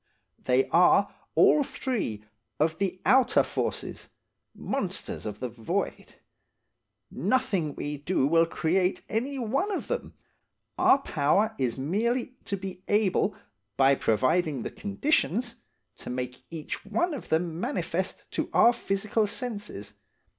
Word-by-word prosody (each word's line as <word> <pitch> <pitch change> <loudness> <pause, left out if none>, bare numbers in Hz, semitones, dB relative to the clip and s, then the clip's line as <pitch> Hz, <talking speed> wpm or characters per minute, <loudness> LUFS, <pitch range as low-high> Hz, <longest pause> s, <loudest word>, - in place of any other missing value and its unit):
They 130 +1 +2
are, 180 +4 +5 0.2
all 295 - +6
three, 215 - -3 0.4
of 160 +2 +1
the 190 -2 -1
outer 260 -1 +5
forces–monsters 190 - -5
of 105 0 -6
the 125 - -2
void. 120 - -3 1.0
Nothing 185 - 0
we 145 0 -4
can 145 - -27
do 180 -7 +2
will 165 +3 +4
create 180 +3 0
any 260 +6 -2
one 270 - 0
of 390 - -2
them, - - -4 0.6
our - - +5
power 205 - +1
is 125 -2 0
merely 230 - 0
to 200 - -2
be 185 -1 -7
able, 205 -1 +2 0.4
by 135 0 +6
providing 135 +4 +1
the - - -4
conditions, 235 - 0 0.4
to - - -9
make 125 0 -5
each 160 -3 -6
one 230 - 0
of 280 - -7
them 165 0 0
manifest 245 +8 -2
to - - -2
our 240 - +7
physical 215 0 0
senses. 205 - -5
190 Hz, 125 wpm, -27 LUFS, 150-235 Hz, 1.0 s, our